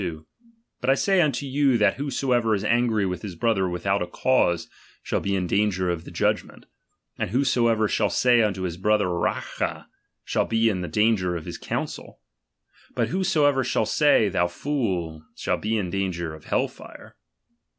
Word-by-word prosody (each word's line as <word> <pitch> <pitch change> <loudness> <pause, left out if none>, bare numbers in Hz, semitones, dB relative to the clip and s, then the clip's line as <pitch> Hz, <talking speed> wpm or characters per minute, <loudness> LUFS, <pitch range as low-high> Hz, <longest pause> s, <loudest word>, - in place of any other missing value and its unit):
22): 80 -4 -5 0.6
But 125 - -1
I 135 - +5
say 195 +4 +2
unto 140 -4 0
you, 135 -2 +2
that 105 -3 +2
whosoever 125 -5 0
I - - +4
is 100 - -3
angry 115 -2 +2
with 90 -1 -3
his 100 -5 -7
brother 95 -1 +1
without 95 +3 -1
a 90 - -2
cause, 90 -4 +1 0.4
shall - - -1
be 100 0 -1
in 90 -1 -1
danger 95 -1 +1
of 85 -1 -5
the - - -9
Judgment; - - -2 0.5
and - - -1
whosoever 115 -2 +2
shall 105 0 +1
say 120 +5 +3
unto 95 -4 0
his 85 -2 -3
brother 105 +2 +2
Racha, 85 -1 -2 0.4
shall - - 0
be 115 0 +2
in 95 -4 -2
danger 100 -1 +1
of 80 - -6
the - - -6
council; - - -5 0.8
but - - 0
whosoever 155 -8 +2
shall 110 - 0
say, 145 -4 +3
thou 90 -3 +1
fool, 90 - -3
shall - - -2
he 110 +1 0
in 90 -4 -2
danger 85 -4 -2
of 80 - -12
hell - - +1
fire. - - -14
105 Hz, 175 wpm, -24 LUFS, 90-125 Hz, 0.8 s, I